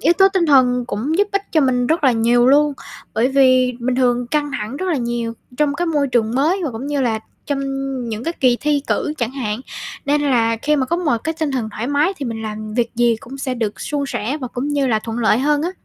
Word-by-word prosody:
yếu - - +4
tố 385 0 +7
tinh 360 -4 +2
thần 250 -3 +4
cũng 260 - -2
giúp 410 0 +3
ích 400 0 +1
cho 315 - +4
mình 250 -2 +2
rất 320 +2 +1
là 260 - +5
nhiều 240 +2 +3
luôn, 290 +2 +4 0.4
bởi 235 +4 +2
vì 255 -2 +4
bình 250 +2 0
thường 245 -1 +2
căng 290 +3 -1
thẳng 220 +1 -4
rất 375 - -3
là 330 - +1
nhiều 235 -1 -2 0.2
trong 295 0 +1
cái 350 +4 -1
môi 295 -4 +1
trường 235 -2 +1
mới 320 +9 +2
và 300 - -1
cũng 235 +3 -6
như 290 -1 -1
là 230 -4 +1 0.3
trong 280 -1 -1 0.5
những 220 0 -4
cái 335 - -1
kỳ 250 -2 +4
thi 295 -1 +1
cử 300 - 0
chẳng 235 -2 -1
hạn, 230 -4 -3 0.4
nên 290 +1 +1
là 230 -5 +2
khi 300 0 +2
mà 265 -2 0
có 340 - 0
một 320 -8 +1
cái 320 - -1
tinh 310 -2 0
thần 250 -5 -2
thoải 220 +3 -4
mái 290 +6 +2
thì 285 - -5
mình 230 -2 -4
làm 215 0 -6
việc 235 -1 0
gì 235 -1 +3
cũng 270 +4 -10
sẽ 265 -1 -2
được 225 -4 -3
suôn 290 -1 -2
sẻ 265 +1 -2
và 255 - -4
cũng 250 +4 -4
như 285 -2 +1
là 220 -4 +2
thuận 225 +1 -5
lợi 220 -1 +3
hơn 295 +2 +1
á. 350 - -1
260 Hz, 255 wpm, -19 LUFS, 235-295 Hz, 0.5 s, tố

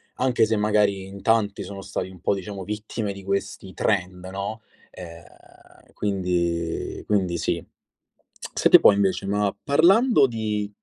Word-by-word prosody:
anche 125 -3 +2
se 110 0 0
magari 105 -2 +1
in 100 0 -10
tanti 105 -3 +1
sono 100 +1 -8
stati 95 -1 -4
un 90 -2 -14
po' 100 - +1
diciamo 95 0 -6
vittime 105 -1 -4
di 100 0 -11
questi 100 -1 -3
trend, 90 -3 -1
no, 100 +4 -5 0.3
ehm, 85 -2 -15
quindi 85 -4 -2
quindi 95 -5 +1
sì. - - -2 0.9
Senti - - +5
un - - -8
po' - - +9
invece, 100 -1 0
ma 100 0 0
parlando 170 - +4
di 105 -3 -3
100 Hz, 145 wpm, -24 LUFS, 95-105 Hz, 0.9 s, po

